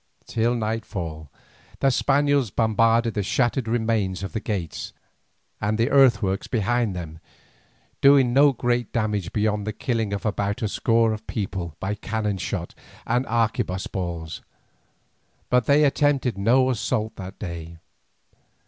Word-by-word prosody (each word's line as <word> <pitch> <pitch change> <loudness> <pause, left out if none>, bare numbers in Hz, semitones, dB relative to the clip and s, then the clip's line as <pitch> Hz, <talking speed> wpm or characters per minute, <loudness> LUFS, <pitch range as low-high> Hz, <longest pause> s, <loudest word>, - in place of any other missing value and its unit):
Till 115 +2 0
nightfall 95 - -4 0.5
the 135 - +3
Spaniards 140 -1 +2
bombarded 115 +2 +2
the 105 - -1
shattered 120 +4 0
remains 110 -5 0
of 95 - -5
the 110 - -1
gates 95 -7 -4 0.7
and 105 +1 0
the 115 +5 +1
earthworks 120 -8 +3
behind 115 -2 0
them, 80 -3 -7 0.8
doing 135 -3 +6
no 140 +2 +6
great 120 -2 -1
damage 105 -5 -1
beyond 105 -1 0
the - - 0
killing 115 -3 -2
of 100 +1 -4
about 100 0 -1
a - - +2
score 115 +1 +2
of 110 - -8
people 95 -6 -4
by 100 +2 -2
cannon 105 -1 -3
shot - - -4 0.3
and 125 +3 0
arquebuss 110 -5 0
balls. 85 -4 -5 1.1
But 125 -2 +3
they 145 +2 +5
attempted 140 -3 +2
no 125 +6 +3
assault 110 -1 -2
that 95 0 -8
day. 85 -3 -7
110 Hz, 135 wpm, -24 LUFS, 100-120 Hz, 1.1 s, doing